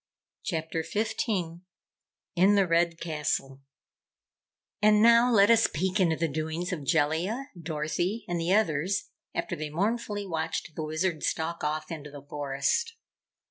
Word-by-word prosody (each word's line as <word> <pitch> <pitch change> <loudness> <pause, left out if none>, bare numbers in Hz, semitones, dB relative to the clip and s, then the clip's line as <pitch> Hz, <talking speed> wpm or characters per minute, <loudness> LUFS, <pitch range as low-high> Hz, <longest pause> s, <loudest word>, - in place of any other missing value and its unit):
CHAPTER 160 -2 -2
15 180 -2 -2 0.7
In 190 +4 +5
the 200 -1 +4
Red 170 -1 +2
Castle 150 -4 -2 1.2
And 210 0 +5
now 235 +2 +6
let 205 -1 +6
us 225 -1 +5
peek 185 +5 -1
into 170 -4 +3
the 165 +1 0
doings 160 +5 -3
of 155 -5 -4
Jellia, 170 - +1
Dorothy 170 +6 -2
and 175 -1 -1
the 170 +2 0
others, 190 -2 +1 0.2
after - - -2
they 155 0 -5
mournfully 205 +4 -1
watched 165 -2 -3
the 160 - -3
Wizard 155 +1 -1
stalk 165 +1 -2
off 155 +2 -2
into 150 -2 -6
the 145 -1 -11
forest. 145 - -1
170 Hz, 140 wpm, -28 LUFS, 155-200 Hz, 1.2 s, now